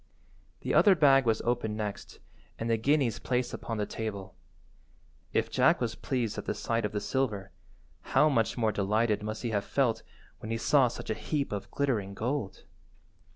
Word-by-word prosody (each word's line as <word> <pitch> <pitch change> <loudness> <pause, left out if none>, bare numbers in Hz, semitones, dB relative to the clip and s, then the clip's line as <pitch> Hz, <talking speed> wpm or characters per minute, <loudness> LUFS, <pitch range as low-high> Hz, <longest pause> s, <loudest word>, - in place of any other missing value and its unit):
The - - -2
other 200 -3 +6
bag 135 -5 +5
was 110 -1 +1
opened 115 -3 -1
next, 105 -2 -5 0.4
and 115 - -3
the 115 -1 +2
guineas 135 0 +1
placed 125 -1 -1
upon 115 - -4
the 105 - 0
table. 100 -4 -5 1.0
If - - 0
Jack - - +4
was - - -1
pleased 120 -5 -2
at - - -7
the - - -2
sight 115 -1 -1
of 105 - -2
the 105 - -2
silver, 105 -5 -2 0.7
how 150 - +7
much 115 -6 +1
more 110 -2 +2
delighted 105 +2 +1
must 110 +2 -5
he 120 - -1
have 100 -2 0
felt 130 -5 +1 0.4
when 110 - -7
he 115 - -1
saw 135 +2 +4
such 115 - -5
a - - +2
heap 140 +5 -2
of 100 -1 -4
glittering 110 -9 -1
gold? 120 -3 -3
115 Hz, 180 wpm, -29 LUFS, 105-130 Hz, 1.0 s, how